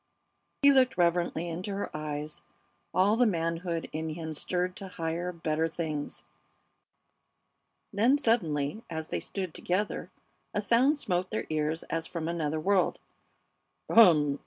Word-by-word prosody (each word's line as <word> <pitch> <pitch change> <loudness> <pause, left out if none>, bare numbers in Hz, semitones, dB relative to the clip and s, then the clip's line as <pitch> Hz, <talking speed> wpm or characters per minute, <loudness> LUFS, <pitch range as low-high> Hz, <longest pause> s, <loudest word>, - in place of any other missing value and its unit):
He 280 - +8
looked 260 -6 +4
reverently 175 -1 +1
into 180 +4 -4
her 200 - -4
eyes, 150 - -4 0.5
all 195 +4 +3
the 245 +1 +4
manhood 165 -2 -1
in 160 +1 -3
him 160 0 -5
stirred 180 +4 -1
to 195 -2 -6
higher, 170 0 -3
better 160 -1 -1
things. 155 - -4 1.7
Then, 235 +8 +4
suddenly, 170 - 0
as 160 -1 -5
they - - -1
stood 185 -5 -5
together, 195 +4 -2 0.5
a - - +2
sound 245 +8 +3
smote 185 -8 -1
their 220 - -2
ears 155 +1 -1
as 165 0 -3
from 165 -2 -4
another 160 -2 -1
world. 190 +3 +2 0.9
"Um! 155 -10 +6
Ah! - - -30
170 Hz, 135 wpm, -29 LUFS, 160-200 Hz, 1.7 s, He